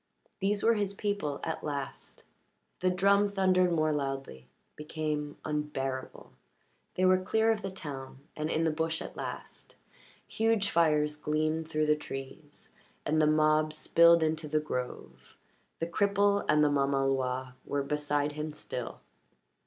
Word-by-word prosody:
These 200 +1 0
were 230 - +5
his 205 -2 -1
people 200 -9 -2
at 160 - -3
last. 140 -2 -6 0.6
The 185 - +2
drum 200 +2 +4
thundered 185 -2 +3
more 155 -2 +2
loudly, 135 - -4 0.3
became 150 -1 -3
unbearable. 140 -4 -4 0.6
They 185 - +2
were 185 0 +5
clear 220 +4 +2
of 215 -1 -1
the 195 - -3
town 135 -7 -8
and 155 0 -2
in 160 - +1
the 160 - +2
bush 160 +1 -1
at - - -9
last; - - -7 0.5
huge 225 -2 +1
fires 150 -3 +3
gleamed 155 +1 -1
through 155 -1 +1
the 150 0 +4
trees, 145 +1 -9 0.3
and 155 +1 +2
the 155 - +4
mob 155 0 +3
spilled 170 +1 +5
into 155 0 -1
the 155 +1 +1
grove. 125 -5 -6 0.4
The 165 - -2
cripple 200 +3 +2
and 150 0 +5
the 150 - +3
mamaloi 135 -2 0
were 140 0 -2
beside 145 0 -1
him 150 +1 -5
still. - - -6
155 Hz, 145 wpm, -30 LUFS, 145-185 Hz, 0.6 s, were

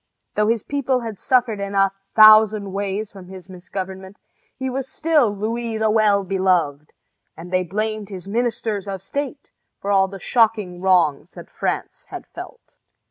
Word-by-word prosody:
Though 210 0 +1
his 230 -1 +1
people 270 -3 -1
had 225 -4 -6
suffered 245 -5 +1
in 200 0 -4
a 195 -1 +3 0.2
thousand 215 -2 +7
ways 200 +1 -3
from 190 -3 -12
his 190 0 -11
misgovernment, 190 +1 -7 0.4
he 260 0 -3
was 265 +1 -3
still 310 -7 +2
Louis 225 +2 -3
the 220 0 +1
Well 210 -2 +3
Beloved, 180 -6 0 0.5
and 175 +3 -10
they 185 - +3
blamed 215 +3 -3
his 190 -2 -8
ministers 220 -2 -2
of 195 -1 -5
state 285 +5 -5 0.3
for 200 - -3
all 195 -1 +4
the 195 +1 -9
shocking 210 -5 +1
wrongs 180 -7 +2
that - - -12
France - - -3
had - - -8
felt. - - -11
200 Hz, 160 wpm, -21 LUFS, 190-225 Hz, 0.5 s, thousand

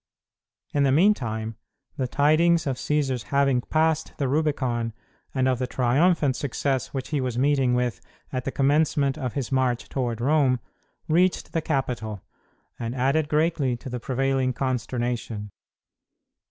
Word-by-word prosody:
In 145 - +2
the 140 -1 +4
meantime, 115 - +1 0.4
the 130 - -1
tidings 155 +5 +3
of 135 -3 -1
Cćsar's 135 -3 0
having 135 +1 +2
passed 160 +2 0
the 140 - 0
Rubicon, 130 -6 0 0.4
and 130 -1 +1
of 130 -2 +1
the 125 - -1
triumphant 140 +3 +2
success 135 0 -1
which 135 -2 -4
he 150 -3 0
was 125 -2 -2
meeting 135 -2 +2
with 125 -1 -1 0.3
at 130 -1 -2
the 135 - -3
commencement 140 0 +2
of 125 -4 -4
his 130 -4 -3
march 130 -2 0
toward 120 -4 -2
Rome, 135 -1 +3 0.5
reached 180 +3 +2
the 165 - +1
capital, 120 - -2 0.6
and 115 +1 -3
added 140 +4 +1
greatly 150 -5 +1
to 130 - -8
the 125 - -3
prevailing 130 +1 0
consternation. 120 -4 -2
130 Hz, 140 wpm, -25 LUFS, 125-145 Hz, 0.6 s, the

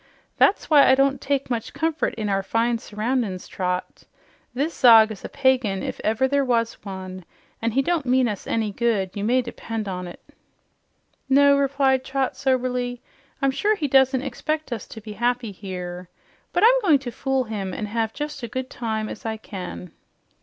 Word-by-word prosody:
That's 395 - +3
why 295 -3 +6
I 260 - +7
don't 275 0 +2
take 275 -2 -1
much 230 -2 -3
comfort 320 -1 -1
in 215 -2 -3
our 195 -1 +1
fine 230 +4 0
surroundin's, 215 -3 -2
Trot. 180 -1 -4 0.5
This 285 +7 -2
Zog 225 -3 +7
is 205 - -9
a - - -6
pagan, 255 -8 +1
if - - -5
ever 225 +5 +2
there 280 +1 +2
was 235 -3 +1
one, 185 -2 -7 0.4
an' 230 - +1
he 270 +3 +2
don't 325 -3 0
mean 255 0 +3
us 205 -4 -5
any 220 -2 0
good, 205 -4 0
you 200 - -4
may 250 +4 +2
depend 225 -2 -5
on 180 -1 -4
't." 175 - -10 1.1
"No," 280 +1 +6
replied 275 -1 +2
Trot 270 -1 -1
soberly, 250 -2 -1 0.4
"I'm 275 - +4
sure 420 +10 +1
he 310 -7 -2
does 265 -1 +5
not 260 -1 -1
expect 300 +2 -3
us 225 - -6
to 220 - -10
be 210 0 -8
happy 240 0 -1
here. 180 -2 -7 0.4
But 355 - +1
I'm - - +6
going 330 -9 +5
to 260 -3 -7
fool 270 +1 -1
him 205 -5 -4
and 210 +3 -4
have 225 +1 -1
just 295 0 -6
as 235 - -4
good 260 +3 -3
a - - -29
time 220 -2 -3
as - - -8
I 220 -1 -3
can." 185 -4 -8
245 Hz, 190 wpm, -23 LUFS, 210-270 Hz, 1.1 s, I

